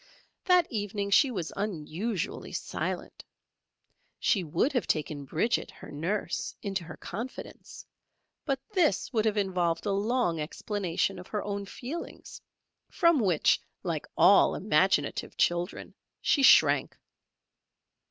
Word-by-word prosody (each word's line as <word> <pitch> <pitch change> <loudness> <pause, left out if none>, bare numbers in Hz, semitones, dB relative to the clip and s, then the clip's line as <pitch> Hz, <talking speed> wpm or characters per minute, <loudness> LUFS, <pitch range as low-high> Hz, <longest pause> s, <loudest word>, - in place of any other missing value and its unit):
That 360 -2 +5
evening 205 -2 -3
she 270 +7 +5
was 180 -9 -4
unusually 195 +1 -3
silent. - - -4 0.9
She 195 - +1
would 205 - 0
have 250 - 0
taken 150 -2 -2
Bridget, 195 - 0
her - - -12
nurse, 175 +5 -3
into 195 -3 -2
her - - -9
confidence, 230 +8 -8 0.6
but 275 -3 -1
this 355 -8 +1
would 220 -2 +1
have 215 -1 +1
involved 180 -4 0
a 205 - 0
long 200 -4 0
explanation 185 +3 -2
of 180 - -10
her 210 - -3
own 200 -1 -4
feelings, 280 - -8 0.5
from 335 -5 +3
which, 185 -9 +3 0.2
like - - -3
all - - +6
imaginative - - +1
children, 175 +2 0 0.3
she 285 - +2
shrank. 270 - +5
200 Hz, 120 wpm, -29 LUFS, 175-235 Hz, 0.9 s, all